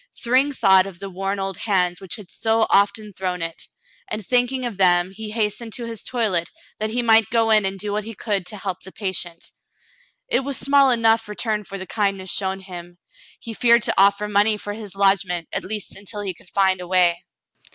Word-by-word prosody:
Thryng 260 +4 +2
thought 190 -7 +4
of 190 -3 -10
the 195 +1 -8
worn 195 +2 -2
old 195 -2 -3
hands 180 -4 0
which 190 -3 -5
had 205 -5 -12
so 225 0 +1
often 205 +1 +2
thrown 180 -2 -3
it, 165 0 -6 0.4
and 215 -1 -4
thinking 250 +2 +1
of 230 -5 -4
them 180 -1 +3
he 215 +2 -7
hastened 215 +1 -2
his 230 -3 -6
toilet 210 -9 -1 0.3
that 215 0 -1
he 240 +2 -1
might 225 -2 +5
go 225 -1 +2
in 215 -2 +5
and 195 0 -3
do 205 +2 -4
what 210 +1 -1
he 225 +1 -8
could 195 -4 -2
to 210 - -6
help 190 -2 -4
the 190 - -11
patient. 185 -4 -4 0.8
It - - +2
was 275 0 -3
small 280 -1 +4
enough 230 -2 +3
return 210 0 -2
for 195 - -7
the 190 - -7
kindness 195 -3 -1
shown 190 -1 -2
him. 175 -2 -10 0.4
He 230 - -7
feared 235 0 +4
to - - +2
offer 200 +1 +4
money 210 +1 +3
for 205 0 -5
his 205 -3 -9
lodgment, 195 -4 +2
at - - -2
least 210 +1 -5
until 205 +2 -7
he 195 -2 -3
could 175 - -19
find 190 -2 +2
a 180 - -7
way. 175 -1 +3
200 Hz, 205 wpm, -22 LUFS, 190-225 Hz, 0.8 s, might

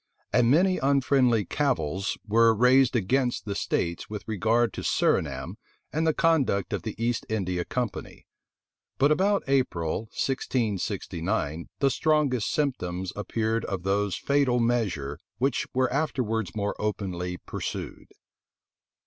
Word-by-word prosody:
And 120 -1 +4
many 185 +7 +4
unfriendly 135 -5 +3
cavils 100 - -1
were 115 +1 +5
raised 125 +3 +4
against 120 +4 +1
the 100 - -2
states 85 -3 -2
with 105 -1 -7
regard 110 +2 +1
to - - -5
Surinam 65 -4 0 0.4
and 160 +2 +1
the - - +5
conduct 145 - +2
of - - -1
the 110 - -5
East 115 +1 -1
India 90 -5 -1
Company.[] 120 +3 -4 0.7
But 140 +3 +4
about 195 +5 +2
April, 115 -9 0
1669 100 - -2
the 135 -1 +2
strongest 145 -8 +1
symptoms 95 - -2
appeared 110 +2 -1
of 95 -3 -4
those 100 0 0
fatal 140 -3 +2
measure 95 - 0 0.2
which 130 +2 0
were 130 -1 +1
afterwards 120 - -1
more 105 -1 -1
openly 90 -4 -3
pursued. - - -6
115 Hz, 125 wpm, -27 LUFS, 95-135 Hz, 0.7 s, were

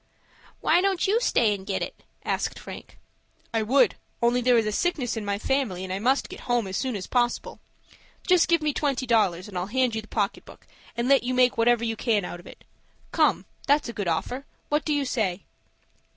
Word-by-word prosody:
"Why 350 - +4
don't 385 -2 +1
you 435 +5 +2
stay 230 - +3
and 195 -2 -6
get - - -2
it?" - - -8 0.2
asked - - -1
Frank. - - -10 0.6
"I 225 - +1
would, 255 +6 +3 0.2
only 240 +1 +2
there 245 0 +4
is 215 -2 +1
sickness 280 -10 0
in 225 - -4
my 200 -1 -1
family, 220 -6 -1
and 185 0 -4
I 190 - -2
must 260 +6 +1
get - - -10
home 240 -3 +2
as 190 0 -5
soon 260 +1 -1
as 190 -2 -4
possible. 240 -1 -1 0.7
Just 360 -2 +4
give 335 -3 +2
me 300 -1 +1
twenty 270 -3 -1
dollars, 200 -7 +2
and 205 - -11
I'll 180 +1 -2
hand 250 +1 +1
you 220 - -2
the 215 - -16
pocket 205 -1 -2
book, - - -16 0.3
and 235 +1 0
let 275 -2 +5
you 250 +2 -2
make 250 -1 +4
whatever 235 0 +3
you 225 -1 -1
can 215 -4 0
out 175 - -7
of 175 - -14
it. - - -14 0.5
Come, - - +2 0.2
that's 285 -2 +3
a - - -5
good 205 -5 -3
offer. 245 +12 -2 0.2
What 295 +1 0
do 310 - -1
you 285 -1 0
say?" 205 -7 -1
235 Hz, 215 wpm, -26 LUFS, 210-270 Hz, 0.7 s, let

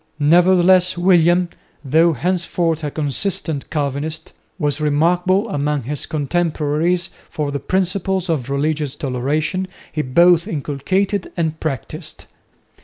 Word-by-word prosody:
Nevertheless 180 +3 +4
William, 175 0 +4 0.4
though 160 +5 +4
henceforth 170 0 -1
a 150 - -1
consistent 155 +1 -2
Calvinist, 150 +2 -3 0.2
was 145 0 -1
remarkable 175 +7 +2
among 145 -4 -1
his 145 +4 -4
contemporaries 165 +3 0 0.2
for 150 -2 -3
the 140 - -2
principles 185 +3 -1
of 150 -7 -2
religious 145 0 -1
toleration 150 +8 -2 0.2
he 155 - -1
both 170 +6 +4
inculcated 185 +5 -1
and 160 -2 -1
practised. 155 +2 -6
160 Hz, 110 wpm, -19 LUFS, 145-180 Hz, 0.4 s, Nevertheless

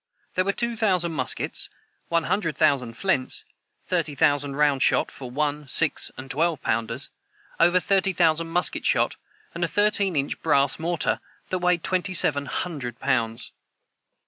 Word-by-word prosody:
There 185 - 0
were 200 - +2
two 235 +3 -3
thousand 185 -7 +1
muskets, 160 - -1 0.4
one 170 -1 +1
hundred 165 -5 -1
thousand 135 -7 +1
flints, 165 -8 0 0.4
thirty 145 - -1
thousand 145 0 +1
round 145 -2 +2
shot - - +2
for 130 -2 -8
one, 145 +2 -2
six, 160 +3 +2
and 135 0 -8
twelve 160 0 0
pounders, 115 0 -1 0.5
over 175 +2 +4
thirty 195 +1 +1
thousand 165 -2 +2
musket 175 +2 +1
shot, - - +2 0.4
and 170 - -3
a - - +2
thirteen 205 -2 +1
inch 140 -1 -2
brass 140 -3 +2
mortar 170 +1 0 0.3
that 185 - -1
weighed 180 -1 +1
twenty 185 0 -1
seven 145 -4 +6
hundred 135 -10 -4
pounds. 115 0 -1
160 Hz, 150 wpm, -24 LUFS, 140-180 Hz, 0.5 s, seven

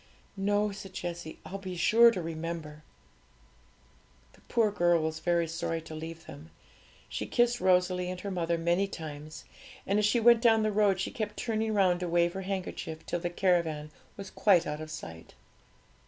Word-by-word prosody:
'No,' 205 +1 +1
said 195 -1 -9
Jessie; 170 -3 -6
'I'll 195 - -6
be 185 -2 -6
sure 230 +7 +6
to 190 -7 -3
remember.' 160 -2 -5 1.5
The - - -22
poor 225 -3 +2
girl 175 -4 +2
was 160 0 -2
very 170 0 +1
sorry 165 0 -3
to 160 0 -10
leave 165 +1 -7
them; 150 +2 -11 0.6
she - - -4
kissed 240 0 +2
Rosalie 180 -1 +2
and 180 0 -5
her 200 - -4
mother 170 -2 0
many 175 +4 +1
times; 155 -4 -8 0.4
and 200 +2 +1
as 210 - +2
she 235 +3 +2
went 235 0 +6
down 225 -2 +4
the 215 - +1
road, 205 -2 +2
she 190 - -2
kept 210 -2 -4
turning 220 -2 -1
round 185 -3 +3
to 180 -1 -3
wave 170 0 +2
her 195 - -4
handkerchief, 185 -4 -5
till 175 - -2
the 175 0 -2
caravan 170 -4 0 0.3
was 195 -1 -8
quite 185 -5 +4
out 150 +1 -4
of 155 - -7
sight. 80 - -9
180 Hz, 180 wpm, -29 LUFS, 165-200 Hz, 1.5 s, sure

